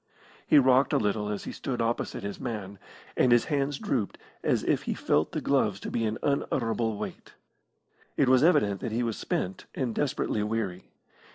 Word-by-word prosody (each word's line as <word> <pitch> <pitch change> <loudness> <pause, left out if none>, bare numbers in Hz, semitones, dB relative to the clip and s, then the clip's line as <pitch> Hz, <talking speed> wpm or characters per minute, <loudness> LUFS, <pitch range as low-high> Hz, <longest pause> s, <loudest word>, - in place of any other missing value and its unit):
He 150 - +6
rocked 130 0 +5
a - - +5
little 105 0 0
as 105 -1 -3
he - - -5
stood 125 -3 -4
opposite 115 -1 -1
his 100 0 -5
man, 100 -5 -5 0.4
and 125 - +3
his 120 -1 +5
hands 140 0 0
drooped 115 -9 -2 0.3
as - - +1
if - - +1
he - - 0
felt 75 +2 +1
the - - -3
gloves 110 -8 +1
to - - -5
be 115 -1 0
an 110 +1 -1
unutterable 115 -5 0
weight. - - -7 0.8
It 140 - +3
was 130 +1 +5
evident 145 - +3
that 115 - -3
he 120 +2 0
was 115 -2 -1
spent 95 +1 -3
and 125 -4 -1
desperately 130 -6 -1
weary. 105 -4 -2
115 Hz, 185 wpm, -28 LUFS, 105-130 Hz, 0.8 s, He